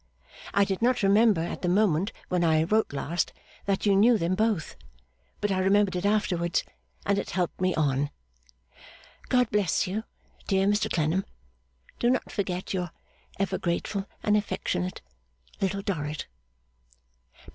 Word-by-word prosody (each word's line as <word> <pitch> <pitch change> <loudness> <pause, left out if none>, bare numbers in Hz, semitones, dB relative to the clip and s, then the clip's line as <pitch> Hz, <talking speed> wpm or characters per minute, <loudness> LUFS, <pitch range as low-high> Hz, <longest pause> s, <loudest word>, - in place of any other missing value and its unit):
I 200 - +5
did 195 0 -2
not 245 -1 +2
remember, 205 -1 +5
at 170 - -4
the 180 - 0
moment 190 0 +2 0.2
when 180 -1 +1
I 160 -1 +4
wrote 215 +6 +1
last, 145 +5 -2 0.3
that 195 0 0
you 200 -1 +4
knew 225 +4 +6
them 170 -1 0
both; 210 -4 0 0.6
but 205 - 0
I 190 - +1
remembered 195 0 +3
it 180 +3 0
afterwards, 180 -5 +1 0.4
and 200 0 +2
it - - -4
helped 180 -1 -2
me 185 -1 +2
on. 145 -2 +1 1.2
God 250 -2 +3
bless 200 -4 +2
you, 205 +4 -3 0.4
dear 195 -1 +2
Mr 205 +1 +1
Clennam. 165 +4 +1 0.8
Do 240 - +3
not 255 - 0
forget 185 -2 -3
Your 180 -2 -2 0.5
ever 195 -1 -1
grateful 195 +3 -2 0.2
and 210 - +3
affectionate 185 -3 -2 0.6
LITTLE 195 0 0
DORRIT. 155 -6 -3
195 Hz, 145 wpm, -27 LUFS, 175-205 Hz, 1.2 s, knew